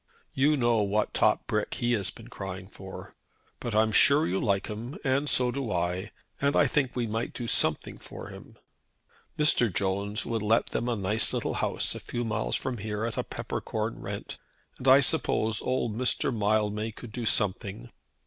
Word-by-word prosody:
You 145 +3 +3
know 120 -3 +2
what 105 +1 0
top - - +2
brick - - -1
he 120 0 0
has 100 -5 +1
been 115 +3 -11
crying 95 -5 -7
for. 95 -2 -10 0.5
But 115 -3 -4
I'm 110 0 +3
sure 140 +7 +5
you 95 +2 0
like 100 -3 +1
him, 115 +6 -6
and 140 +1 +1
so 125 -1 +3
do 135 -4 -3
I, 90 +3 -1 0.3
and 140 0 +2
I - - +5
think 135 -2 0
we 120 -2 0
might 115 +2 -3
do 120 - -5
something - - +2
for - - -9
him. - - -12 0.8
Mr. 135 -7 +3
Jones 100 +3 -1
would 115 -2 -2
let 110 +2 +2
them 120 - -1
a 120 - 0
nice 105 +2 +3
little - - -1
house - - 0
a - - -6
few 120 0 -4
miles - - -1
from 125 -3 -3
here 105 +1 -3
at 115 - -3
a - - -1
peppercorn - - -4
rent; - - -6 0.4
and 130 - -4
I 135 +2 +8
suppose 115 -6 +2
old 125 -4 -1
Mr. 125 0 +1
Mildmay 105 +1 0
could 115 +1 -10
do 115 0 -4
something. 105 +4 0
110 Hz, 185 wpm, -28 LUFS, 105-125 Hz, 0.8 s, I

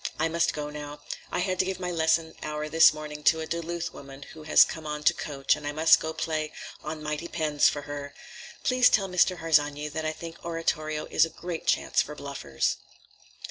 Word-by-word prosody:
"I 160 +1 +1
must 170 0 +1
go 150 -1 -4
now. 145 0 -8 0.3
I - - -1
had 185 0 -1
to 185 - +3
give 190 -1 -3
my 180 -1 -3
lesson 160 -1 +1
hour 150 0 -4
this 160 +1 +7
morning 150 -1 -7
to 160 - +5
a 160 - -3
Duluth 170 +1 -4
woman 135 0 -11
who 160 - -11
has 155 - +6
come 160 -1 -7
on 150 0 -4
to - - +5
coach, 135 -2 0
and 145 - -7
I - - -1
must 160 +2 +5
go 160 - -4
and 160 - -7
play 155 -1 -2 0.3
'On 155 0 -5
Mighty 150 +2 -3
Pens' 155 -4 +2
for 145 - -5
her. 145 0 -7 0.5
Please 255 -1 +5
tell 195 -2 +2
Mr. 180 0 +2
Harsanyi 150 -2 +1
that 160 +2 -4
I 155 - 0
think 165 +1 -9
oratorio 155 -2 -2
is - - +5
a 165 - +1
great 170 +1 -6
chance - - +2
for 150 - -6
bluffers." 140 - -2
155 Hz, 215 wpm, -27 LUFS, 150-165 Hz, 0.5 s, this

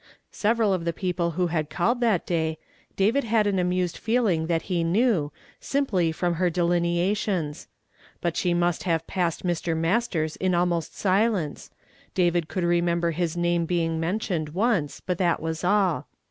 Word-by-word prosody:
Severaf 220 -1 +2
of 180 -3 -1
the 170 0 -1
i.eople 175 -2 -1
who 180 +3 +1
had 155 -3 -1
called 205 - 0
that 220 -7 +2
day, 160 -2 -1 0.4
David 225 +9 +2
had 225 -1 +2
an 200 -2 +1
amused 180 -1 0
feehng 220 -9 +1
that 165 -1 0
he 175 -3 -1
knew, 175 - +2 0.3
simj.ly 200 -13 +1
from 175 +2 -1
her 175 +2 +1
delinea 175 +2 +1
tions. 175 -8 -3 0.6
Rut 170 -2 0
she 175 -2 +1
must 175 0 +1
have 165 -3 0
passed 175 -2 -2
Mr. 170 -2 -1
]\Iastei 170 0 +1
s 155 - -6
in 185 -1 +1
almost 175 -2 0
silence; 195 - 0 0.5
David 175 -2 +2
could 185 0 -3
remember 170 0 +1
his 170 +1 -2
name 175 -1 +1
be 170 -1 +1
ing 165 0 -2
mentioned 170 -2 -1
once, 195 -8 0
but 180 -2 -3
that 175 -3 +2
was 160 +1 -4
all. 190 -2 +2
175 Hz, 170 wpm, -25 LUFS, 165-195 Hz, 0.6 s, Severaf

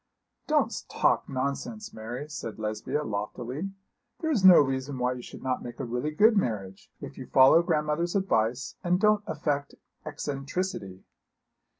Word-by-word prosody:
'Don't - - +1
talk - - +1
nonsense, 140 - -3
Mary,' 120 +6 -6
said 145 -7 -6
Lesbia, 110 +7 -2
loftily. 120 - -4 0.5
'There 320 -2 -1
is 225 -10 +1
no 185 -2 +10
reason 135 0 0
why 125 0 0
you 125 - -7
should - - -11
not 130 -1 -1
make 120 +2 -8
a 135 - -3
really 125 +5 -2
good 215 +9 +4
marriage, 105 - -2
if - - -8
you - - -7
follow 135 +5 +7
grandmother's 165 +1 0
advice 125 - 0
and 180 +1 +2
don't 210 0 +4
affect 145 -2 -2 0.3
eccentricity.' 145 - -4
140 Hz, 150 wpm, -28 LUFS, 120-175 Hz, 0.5 s, no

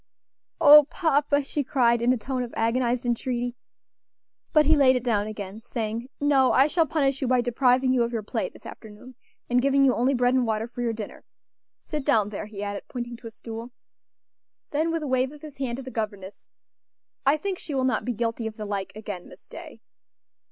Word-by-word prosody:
"O 295 0 +9
papa!" 290 -2 +1
she 290 +1 -2
cried, 235 -3 +2
in 240 +1 +3
a 255 - +2
tone 255 +3 -3
of 240 -1 -5
agonized 240 +2 0
entreaty. 245 0 -2 1.0
But 305 -2 +5
he 315 +2 +5
laid 265 -3 +5
it 250 - -1
down 215 -4 0
again, 210 0 -7
saying: 230 +1 -4
"No, 275 -3 +3
I 265 - +6
shall 320 +2 +1
punish 275 -2 0
you 265 - 0
by 250 0 +3
depriving 250 +1 +2
you 250 - +2
of 235 0 0
your 225 -3 -3
play 355 - -2
this - - -18
afternoon, 220 +3 -11 0.3
and 245 +1 +2
giving 275 +1 +3
you 260 - +4
only 255 +4 +1
bread 245 0 +2
and 260 -1 +3
water 220 -1 -1
for 245 0 -7
your 235 -1 0
dinner. 220 -2 -7 0.6
Sit 300 -3 -4
down 220 -8 +2
there," 210 0 -6
he 205 -1 -7
added, 200 0 -5
pointing 240 -1 -5
to 235 - -10
a - - -6
stool. 230 +2 -9 1.0
Then, 310 +3 0
with 330 -1 -2
a - - -3
wave 260 0 +1
of 300 0 -14
his 300 -2 -10
hand 260 -3 -2
to 265 - -7
the 260 - -8
governess, 205 -4 -5 0.8
"I 275 +3 +3
think 380 +3 -4
she 295 - -6
will 260 - +1
not 255 0 +1
be 245 - -2
guilty 230 0 -2
of 220 - -8
the 215 - -5
like 200 -2 -3
again, 205 -4 -7
Miss - - -16
Day." - - -11
245 Hz, 210 wpm, -25 LUFS, 225-275 Hz, 1.0 s, O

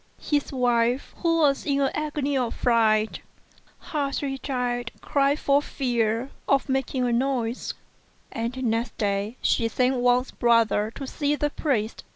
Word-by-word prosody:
His 290 -2 -1
wife, 245 -1 +1
who 330 -1 +1
was 280 -2 +3
in 280 -1 0
an 275 -1 +2
agony 295 -2 -2
of 250 -3 -1
fright, 220 -2 +2 0.6
hardly 280 -2 -3
dared 245 -3 -2
cry 280 0 +2
for 285 -1 +2
fear 240 -3 -1 0.2
of 275 0 +3
making 265 -1 0
a 240 - +1
noise; 245 -1 -1 0.6
and 240 +3 -3
next 230 0 -1
day 205 +3 -1
she 230 - +2
sent 255 +3 +1
Wang's 245 +1 +2
brother 225 -2 +2
to 275 - -5
see 290 +2 -1
the 295 0 -1
priest. 235 -9 -1
250 Hz, 145 wpm, -25 LUFS, 230-275 Hz, 0.6 s, was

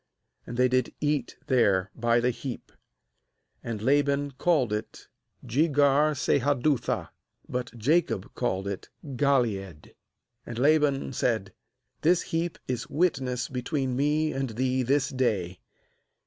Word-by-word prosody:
And 120 - -6
• - - -6
they 125 0 +5
did 130 -1 0
eat 145 -4 -1
there 100 -9 +2
by 120 0 +2
the 125 +1 +2
heap. 125 +1 -7 0.9
47And 115 -3 -4
Laban 140 +1 +2
called 135 -4 +1
it 105 - -5 0.4
aJegar 145 +1 +3
sahadutha: 140 0 +1 0.4
but 125 -1 -3
Jacob 130 - +1
called 95 -6 -2
it 100 -2 -5 0.2
bGaleed. 120 - -1 0.5
48And 120 - -6
Laban 145 0 +2
said: 110 -6 -1 0.5
'This 175 +3 +3
heap 165 +1 -2
is 125 -2 -3
witness 135 -7 0
between 130 0 -2
me 150 +3 +1
and 135 -1 -2
thee 130 +3 0
this 135 +2 +1
day.' 105 -9 -1
130 Hz, 120 wpm, -27 LUFS, 120-145 Hz, 0.9 s, they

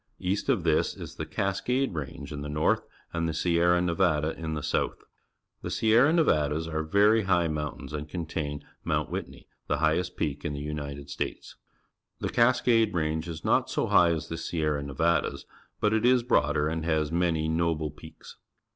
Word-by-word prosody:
East 95 +7 -2
of 115 -10 +2
this 80 -2 +1
is - - -9
the - - -4
Cascade 125 +6 -1
Range 70 -2 -6
in 70 - -5
the 75 - -5
north 75 +1 +1 0.3
and 85 -1 -1
the 80 - -3
Sierra 85 +1 +3
Nevada 85 -3 +1
in 80 -1 -4
the 75 - -4
south. - - -1 0.6
The - - -5
Sierra 115 +6 +4
Neva 115 - +3
das 80 +2 -2
are 80 -1 -2
very 100 +6 +3
high 90 -3 +3
mountains 75 -1 -4
and 75 0 -5
contain 80 -4 -4 0.2
Mount - - -1
Whitney, - - -6 0.2
the - - +1
hi 80 0 +2
ghest 90 0 -3
peak 75 -1 -2
in 75 - -2
the 70 - -4
United 70 -1 -5
States. - - -5 0.6
The - - -2
Cascade 115 -3 +3
Range 80 0 -1
is 80 -1 -7
not - - +2
so - - 0
high 90 -1 +6
as 80 -2 -2
the 80 - -5
Sierra 75 -4 -1
Nevadas, 75 +4 0 0.3
but 105 0 +2
it 110 - +1
is 125 0 +4
broader 75 -9 +2
and 80 +1 -2
has 80 -2 0
many 85 -2 +1
noble 80 -2 0
peaks. - - -13
80 Hz, 180 wpm, -28 LUFS, 75-90 Hz, 0.6 s, high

